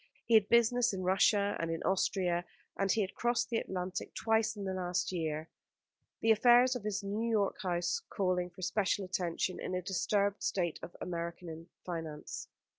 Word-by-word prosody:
He 235 Hz, -, 0 dB
had 215 Hz, -2 st, +6 dB
business 235 Hz, 0 st, +4 dB
in 185 Hz, -1 st, -3 dB
Russia, 200 Hz, +2 st, +3 dB
and 165 Hz, -, -1 dB
in 165 Hz, 0 st, -3 dB
Austria, 180 Hz, -2 st, +1 dB, 0.3 s
and 195 Hz, -1 st, +1 dB
he 225 Hz, -, +2 dB
had 195 Hz, -1 st, -2 dB
crossed 240 Hz, 0 st, 0 dB
the 230 Hz, -, +2 dB
Atlantic 185 Hz, 0 st, -4 dB
twice 220 Hz, 0 st, +1 dB
in 205 Hz, -, -6 dB
the 190 Hz, -1 st, -2 dB
last 180 Hz, -1 st, -1 dB
year, 160 Hz, -3 st, -2 dB, 0.7 s
the 225 Hz, -, +4 dB
affairs 245 Hz, +3 st, +6 dB
of 245 Hz, -, -5 dB
his 205 Hz, -2 st, -2 dB
New 210 Hz, +4 st, -2 dB
York 210 Hz, -3 st, +1 dB
house 180 Hz, -, -1 dB
calling 180 Hz, -2 st, 0 dB
for 180 Hz, +1 st, -11 dB
special 200 Hz, +1 st, 0 dB
attention 180 Hz, 0 st, -2 dB
in 185 Hz, -, -3 dB
a 180 Hz, -, -1 dB
disturbed 200 Hz, +2 st, 0 dB
state 175 Hz, -4 st, -1 dB
of 175 Hz, -, -9 dB
American 170 Hz, -1 st, -5 dB, 0.2 s
finance. 165 Hz, -4 st, -5 dB
190 Hz, 175 wpm, -33 LUFS, 175-220 Hz, 0.7 s, had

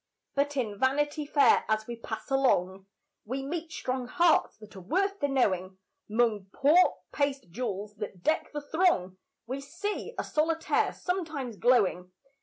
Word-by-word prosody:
But 285 Hz, +1 st, 0 dB
in 210 Hz, -6 st, -2 dB
Vanity 290 Hz, +3 st, +1 dB
Fair, 285 Hz, -1 st, +5 dB
as 215 Hz, 0 st, +1 dB
we 235 Hz, -, -5 dB
pass 230 Hz, +4 st, -7 dB
along, 195 Hz, -8 st, +1 dB, 0.4 s
We 260 Hz, +5 st, -4 dB
meet 325 Hz, +2 st, -4 dB
strong 255 Hz, -4 st, -3 dB
hearts 340 Hz, +4 st, +3 dB
that 215 Hz, -1 st, -14 dB
are 190 Hz, -, -9 dB
worth 390 Hz, -, 0 dB
the 285 Hz, -, +1 dB
knowing 190 Hz, -9 st, 0 dB, 0.3 s
'Mong 215 Hz, -4 st, +1 dB
poor 310 Hz, +10 st, +4 dB
paste 280 Hz, -, -1 dB
jewels 205 Hz, -1 st, -4 dB
that 200 Hz, -4 st, -7 dB
deck 315 Hz, +1 st, +1 dB
the 295 Hz, -, -4 dB
throng, 290 Hz, -, +1 dB, 0.3 s
We 260 Hz, +4 st, -4 dB
see 410 Hz, -, -5 dB
a -, -, -1 dB
solitaire 320 Hz, +1 st, +1 dB
sometimes 315 Hz, -, -3 dB
glowing. 195 Hz, -6 st, +2 dB
265 Hz, 150 wpm, -29 LUFS, 210-305 Hz, 0.4 s, Fair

